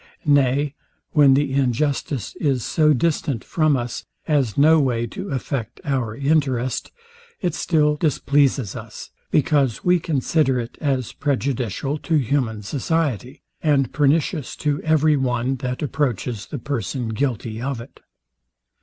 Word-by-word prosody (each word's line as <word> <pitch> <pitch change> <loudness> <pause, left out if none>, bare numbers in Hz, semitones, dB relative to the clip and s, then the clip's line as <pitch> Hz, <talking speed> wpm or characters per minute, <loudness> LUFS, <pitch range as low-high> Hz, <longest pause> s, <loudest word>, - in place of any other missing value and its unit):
Nay 140 0 +3 0.4
when 140 -3 +6
the 140 -1 +1
injustice 135 -1 -1
is 135 -6 0
so 155 -1 +3
distant 145 -4 0
from 155 -4 +2
us, 120 -1 -4 0.2
as 140 -9 +1
no 155 +3 +6
way 120 -5 +1
to 190 - -7
affect 130 -3 -3
our 125 -6 -1
interest, 135 -3 0 0.5
it 175 -5 -1
still 150 -3 +2
displeases 140 - +1
us; - - -9 0.2
because 140 -5 +2
we 180 0 +4
consider 145 -3 +1
it 120 0 -6
as 135 -5 0
prejudicial 135 0 -1
to 165 - -1
human 125 -6 0
society, 140 - -2 0.2
and 140 -5 +2
pernicious 150 0 +1
to 145 -1 -1
every 155 -1 +3
one 130 0 0
that 125 +3 -4
approaches 125 -6 -2
the 145 - -5
person 125 -2 -3
guilty 115 -2 -2
of 135 -1 -2
it. 120 +4 -12
140 Hz, 130 wpm, -22 LUFS, 125-150 Hz, 0.5 s, when